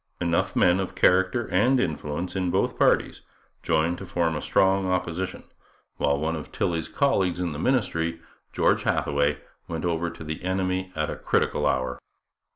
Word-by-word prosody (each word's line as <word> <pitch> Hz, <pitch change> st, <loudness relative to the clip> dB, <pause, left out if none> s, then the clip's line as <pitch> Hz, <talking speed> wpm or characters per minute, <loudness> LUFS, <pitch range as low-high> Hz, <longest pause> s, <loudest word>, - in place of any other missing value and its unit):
Enough 85 Hz, -1 st, 0 dB
men 90 Hz, +2 st, +4 dB
of 95 Hz, -, -4 dB
character 95 Hz, +5 st, +3 dB
and 125 Hz, +8 st, +3 dB
influence 80 Hz, -1 st, -3 dB
in 90 Hz, -1 st, 0 dB
both -, -, 0 dB
parties -, -, +2 dB, 0.4 s
joined 80 Hz, +2 st, +1 dB
to 95 Hz, -, -7 dB
form 85 Hz, -3 st, 0 dB
a 75 Hz, -, -3 dB
strong 95 Hz, 0 st, +2 dB
opposition, 90 Hz, 0 st, -2 dB, 0.5 s
while 70 Hz, 0 st, +1 dB
one 80 Hz, +3 st, -1 dB
of 80 Hz, -, -7 dB
Tilley's 85 Hz, -2 st, -1 dB
colleagues 95 Hz, -, +1 dB
in 90 Hz, -2 st, -1 dB
the 75 Hz, -, -6 dB
ministry, 85 Hz, -8 st, 0 dB, 0.3 s
George -, -, +2 dB
Hathaway, 70 Hz, +1 st, +1 dB, 0.3 s
went 80 Hz, +1 st, -4 dB
over 85 Hz, 0 st, 0 dB
to 80 Hz, -, -10 dB
the 80 Hz, +2 st, -6 dB
enemy 95 Hz, 0 st, -1 dB
at 80 Hz, -1 st, -1 dB
a -, -, -4 dB
critical -, -, 0 dB
hour. 65 Hz, -1 st, -1 dB
85 Hz, 160 wpm, -25 LUFS, 80-95 Hz, 0.5 s, men